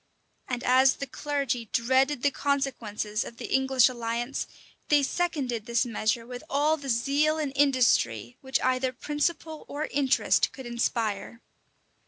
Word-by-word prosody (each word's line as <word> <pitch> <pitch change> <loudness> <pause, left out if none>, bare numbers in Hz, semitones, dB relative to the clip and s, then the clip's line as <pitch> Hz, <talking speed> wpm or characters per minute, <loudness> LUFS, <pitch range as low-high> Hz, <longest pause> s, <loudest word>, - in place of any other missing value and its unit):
[] - - -44
And 250 -1 -3
as 260 +1 +5
the 275 - -5
clergy 275 -3 -2
dreaded 260 +3 +2
the 285 - +3
consequences 240 -7 -2
of 235 - -10
the - - -5
English 265 -2 +4
alliance, 240 +1 -3 0.4
they 290 -1 +4
seconded 270 -9 -2
this 235 +1 +1
measure 230 0 -1
with 245 0 -8
all 295 +3 +2
the 285 -3 -8
zeal 280 +6 +2
and 295 -4 -2
industry 235 - +2
which 265 0 0
either 255 0 +1
principle 305 +4 -2
or 295 +2 -3
interest 275 -2 +2
could 265 - -9
inspire. 230 -2 -2
260 Hz, 145 wpm, -27 LUFS, 235-285 Hz, 0.4 s, as